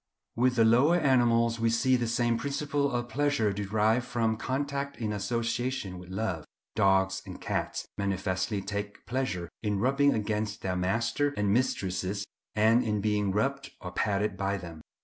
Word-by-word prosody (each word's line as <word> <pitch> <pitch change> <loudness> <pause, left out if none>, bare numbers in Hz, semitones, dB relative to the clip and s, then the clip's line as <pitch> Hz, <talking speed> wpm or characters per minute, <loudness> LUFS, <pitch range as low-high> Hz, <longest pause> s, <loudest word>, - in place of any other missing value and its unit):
With 125 +1 +2
the 115 -2 +5
lower 125 +9 +5
animals 120 -6 +3
we 115 0 +2
see 130 +3 +3
the 120 -2 0
same 120 0 +1
principle 140 +2 -1
of 120 -1 -2
pleasure 130 -4 +1
derived 105 +4 +1
from 115 -3 0
contact 140 +3 -3
in 110 -2 -2
association 115 -1 -2
with 90 0 -12
love. 95 -5 -2 0.3
Dogs 95 0 +3
and - - -9
cats - - -3
manifestly 95 0 -1
take 100 0 -5
pleasure 110 -7 -2
in 105 -2 0
rubbing 140 +4 +3
against 105 0 -2
their 90 -1 -1
masters 115 +10 0
and 100 -1 +2
mistresses, 100 -4 -1 0.3
and 110 +3 +4
in 105 -1 0
being 105 -1 +1
rubbed 135 +8 -1
or 90 - -7
patted 100 0 0
by 100 +1 -1
them. 85 -3 -9
110 Hz, 155 wpm, -29 LUFS, 100-125 Hz, 0.3 s, the